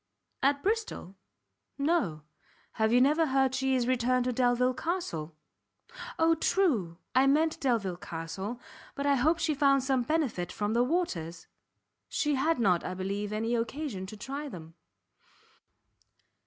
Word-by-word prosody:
"At 280 +1 +2
Bristol? 425 - -2 0.6
no; 280 - 0 0.5
have 220 0 +1
you 245 - +5
never 305 +5 +4
heard 265 -1 +2
she 265 0 +1
is 250 -2 +1
returned 255 0 +1
to 250 - 0
Delvile 250 +1 +2
Castle?" 250 - -3 0.8
"O, 325 0 +4
true! 265 - +1 0.2
I 265 +1 +4
meant 310 +3 +2
Delvile 220 -9 0
Castle, 190 +5 -6 0.4
but 280 - -3
I 285 - +4
hope 300 +5 +3
she 330 -2 0
found 275 -2 +3
some 265 -1 +1
benefit 240 - -1
from 210 +1 -2
the 235 - +3
waters?" 185 - -2 0.6
"She 295 -1 0
had 305 +5 +1
not, 185 -7 +3
I 185 - -4
believe, 200 +2 -3
any 225 +2 -1
occasion 235 -4 -3
to 215 - -9
try 280 +7 -5
them." 165 -7 -10
255 Hz, 140 wpm, -29 LUFS, 200-290 Hz, 0.8 s, you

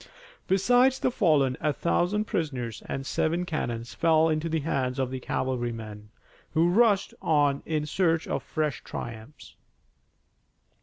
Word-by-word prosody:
Besides 245 +7 +4
the - - 0
fallen 150 - +2
a 150 - +2
thousand 180 +7 0
prisoners 130 - -3
and 135 - -4
seven 170 +5 0
cannon 120 -9 -3
fell 160 +5 +2
into 155 +1 -1
the 160 -1 0
hands 135 -4 -1
of 130 -1 -1
the 130 - -4
cavalrymen, 115 -5 -4 0.5
who 165 +2 +4
rushed 205 0 +3
on 145 -3 +2
in 155 -2 -1
search 165 +1 +1
of - - -2
fresh 155 -4 -2
triumphs. 115 +5 -8
155 Hz, 135 wpm, -27 LUFS, 130-170 Hz, 0.5 s, Besides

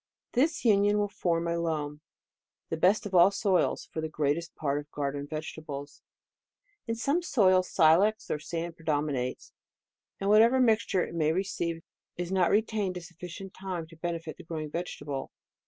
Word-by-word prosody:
This 300 +3 +1
uni 205 -2 +5
on 210 - +2
will 205 0 +1
form 170 -3 -1
a 170 0 0
loam, 150 -3 -2 0.7
the - - -1
best 190 +7 +3
of 200 - -6
all 175 +1 +7
soils 195 -2 +1
for 160 - -3
the 160 - -3
greatest 155 +2 -1
part 145 -2 -1
of 150 0 -10
garden 145 0 -3
vegetables, 155 -2 -7 0.9
In 230 - -1
some 280 +9 +1
soi!s, 185 - +3
silex 190 +6 +4
or 150 - -1
sand 165 +2 -4
predominates, 145 -6 -2 0.7
and 195 - -2
whatever 230 +5 +6
moisture 220 -6 +3
it - - -9
may 155 -2 +2
receive 170 -2 -2 0.3
is 175 +1 -3
not 185 -2 +3
retained 210 -3 +1
a - - -6
sufficient 180 +3 -9
time 185 -3 -5
to 165 - -14
benefit 165 -1 -4
the - - -11
grow 160 -1 -5
ing 155 -1 -6
vegetable. 145 -5 -4
170 Hz, 170 wpm, -29 LUFS, 155-200 Hz, 0.9 s, all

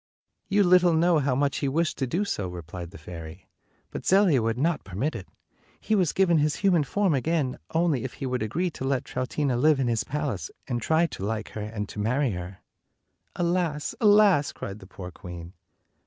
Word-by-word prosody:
"You 205 +1 +4
little 180 -1 +5
know 170 0 +4
how 135 -2 +1
much 140 +1 +1
he 140 - -1
wished 160 +4 0
to 135 - 0
do 180 +10 0
so," 100 - -2
replied 85 0 -7
the 100 - -12
fairy; 80 -2 -10 0.4
"but - - -6
Zelia 185 - +4
would 115 +1 -1
not 160 +4 0
permit 105 - -2
it. 100 -6 -7 0.5
He - - -2
was 185 -7 +3
given 175 -4 +3
his 150 0 +1
human 180 -6 +3
form 195 +4 +1
again, 140 -1 0
223 160 - +1
only 160 -8 +1
if 130 - -5
he 140 - -6
would 125 -1 -2
agree 165 - -1
to 130 - -7
let 135 -1 0
Troutina 130 +1 -1
live 150 +2 +4
in 130 - +1
his 115 -2 +1
palace, 145 -8 -3 0.2
and 120 -2 -2
try 160 +7 +3
to 145 - -6
like 110 +1 -3
her 110 - -6
and 105 -1 -4
to - - -7
marry 125 +5 +1
her." 90 0 -7 0.7
"Alas! 170 -4 0
Alas!" 205 -8 +5
cried 100 +2 -7
the 95 - -13
poor 90 -2 -9
queen. 85 -1 -9
135 Hz, 200 wpm, -26 LUFS, 105-170 Hz, 0.7 s, little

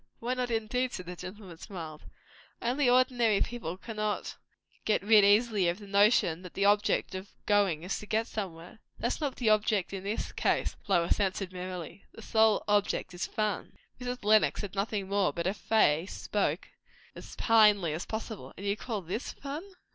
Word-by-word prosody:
"Why 240 +2 -2
not, 250 -1 -2
indeed!" 240 +3 -1
said 185 - -5
the 180 +1 -7
gentleman, 185 -1 -9
smiling. 160 -5 -8 0.5
"Only, 250 +2 +1
ordinary 245 -4 +3
people 205 -8 -3
cannot 215 0 -3 0.5
get 215 - +1
rid 210 0 +6
easily 205 -1 +4
of 170 - -2
the 205 - -11
notion 200 -4 +3
that 180 -2 -11
the 200 - +1
object 205 -1 +2
of 190 +1 -6 0.2
going 200 -6 +2
is 185 - -2
to 210 - -10
get 220 +2 +1
somewhere." 185 -3 -7 0.2
"That's 240 +6 -2
not 285 -3 -1
the 225 -4 +2
object 210 -3 +1
in 190 -1 -5
this 205 +3 -3
case," - - 0
Lois 175 -2 +2
answered 190 -1 -1
merrily. 180 0 -7
"The - - -11
one - - -12
sole 220 -1 +3
object 205 -2 +1
is 175 - -3
fun." 215 -2 -2 0.3
Mrs. 250 -3 -5
Lenox 215 0 +4
said 205 -3 -6
nothing 200 0 -2
more, 200 -4 +1
but 170 +3 -4
her 190 - +1
face 190 -5 +2
spoke - - -2 0.4
as - - -11
plainly 210 -7 +4
as 165 +5 -5
possible, 220 -1 -6
And 200 - -7
you 200 0 +1
call 215 -3 -4
this 185 +9 -4
fun! 285 +2 -6
205 Hz, 180 wpm, -30 LUFS, 185-225 Hz, 0.5 s, rid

